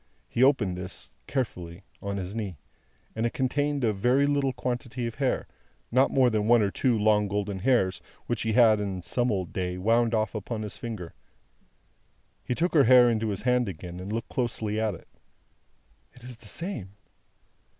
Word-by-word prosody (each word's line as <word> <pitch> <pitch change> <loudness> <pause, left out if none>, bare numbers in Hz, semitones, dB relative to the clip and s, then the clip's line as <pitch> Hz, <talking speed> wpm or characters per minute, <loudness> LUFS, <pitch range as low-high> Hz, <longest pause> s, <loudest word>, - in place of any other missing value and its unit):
He 120 - -2
opened 120 -9 +3
this, 90 +1 -7 0.2
carefully, 90 -9 -4 0.2
on 100 0 -3
his 95 0 -5
knee, 100 -7 -4 0.6
and 110 - -1
it 120 - 0
contained 145 +1 0
a 110 -2 +2
very 125 +8 +3
little 140 -2 +1
quantity 125 -1 -3
of 115 - -3
hair: 135 0 -1 0.4
not 130 +3 +4
more 130 -2 +3
than 105 -1 0
one 120 -1 +5
or 100 - 0
two 125 +1 +1
long 105 -1 +3
golden 100 -1 -2
hairs, 95 -5 +2 0.2
which 120 -2 -2
he 110 -1 0
had, 110 -2 +6
in 95 -3 -3
some 120 +7 0
old 95 -4 -2
day, 90 -1 -2
wound 115 +4 +2
off 110 0 0
upon 110 0 -4
his 105 - -5
finger. 110 -8 -6 1.3
He 125 - -2
took 175 +5 0
her 145 -4 +6
hair 125 0 +7
into 110 -1 0
his 100 -1 -3
hand 125 -3 +2
again, 90 0 -8
and 95 +3 -6
looked 115 +1 -3
closely 110 -4 -2
at 110 -3 0
it. - - -15 1.1
"It 125 - -17
is 125 -1 -9
the 115 - -15
same. 115 - -5
110 Hz, 180 wpm, -27 LUFS, 100-125 Hz, 1.3 s, hair